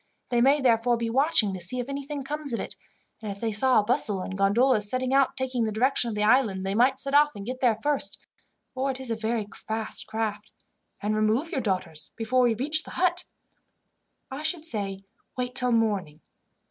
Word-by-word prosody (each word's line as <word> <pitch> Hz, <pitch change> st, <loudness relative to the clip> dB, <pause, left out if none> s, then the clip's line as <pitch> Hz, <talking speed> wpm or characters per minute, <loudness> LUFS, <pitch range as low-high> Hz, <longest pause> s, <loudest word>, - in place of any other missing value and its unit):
They 240 Hz, -1 st, +1 dB
may 275 Hz, +3 st, +4 dB
therefore 240 Hz, -1 st, +2 dB
be 230 Hz, -1 st, -3 dB
watching 260 Hz, -6 st, +3 dB
to 185 Hz, -, -6 dB
see 220 Hz, +9 st, +1 dB
if 245 Hz, -, -4 dB
anything 280 Hz, 0 st, -5 dB
comes 290 Hz, -1 st, -4 dB
of 230 Hz, -, -1 dB
it; -, -, -6 dB, 0.5 s
and 215 Hz, -2 st, -5 dB
if 200 Hz, -, -8 dB
they 225 Hz, 0 st, -2 dB
saw 255 Hz, +5 st, +4 dB
a -, -, +1 dB
bustle 215 Hz, -4 st, 0 dB
and 190 Hz, -, -6 dB
gondolas 210 Hz, +2 st, +3 dB
setting 255 Hz, +2 st, -1 dB
out 275 Hz, 0 st, +2 dB
taking 255 Hz, -2 st, -1 dB
the 220 Hz, -, -1 dB
direction 240 Hz, +2 st, +1 dB
of 220 Hz, -, -4 dB
the 210 Hz, -, -1 dB
island, 215 Hz, -5 st, +2 dB
they 195 Hz, -, -1 dB
might 245 Hz, +5 st, +3 dB
set 275 Hz, 0 st, -1 dB
off 295 Hz, -2 st, +4 dB
and 200 Hz, -1 st, -8 dB
get 255 Hz, +2 st, -5 dB
there 240 Hz, -5 st, +2 dB
first, 290 Hz, -1 st, +2 dB, 0.6 s
for 265 Hz, +1 st, -2 dB
it 265 Hz, -1 st, -4 dB
is 260 Hz, -3 st, -4 dB
a -, -, 0 dB
very 220 Hz, -1 st, -2 dB
fast 220 Hz, 0 st, -4 dB
craft, 215 Hz, -1 st, -4 dB, 0.5 s
and 210 Hz, +1 st, 0 dB
remove 220 Hz, +9 st, 0 dB
your 265 Hz, -, -1 dB
daughters 185 Hz, -7 st, -3 dB
before 250 Hz, +3 st, +1 dB
we 240 Hz, -2 st, +3 dB
reach 300 Hz, +6 st, +3 dB
the -, -, -10 dB
hut. 355 Hz, 0 st, +1 dB, 1.1 s
"I 270 Hz, +3 st, -5 dB
should 315 Hz, +1 st, -2 dB
say 195 Hz, -8 st, -4 dB, 0.3 s
wait 250 Hz, 0 st, -3 dB
till 250 Hz, -1 st, +2 dB
morning. 200 Hz, -9 st, 0 dB
235 Hz, 210 wpm, -26 LUFS, 210-270 Hz, 1.1 s, may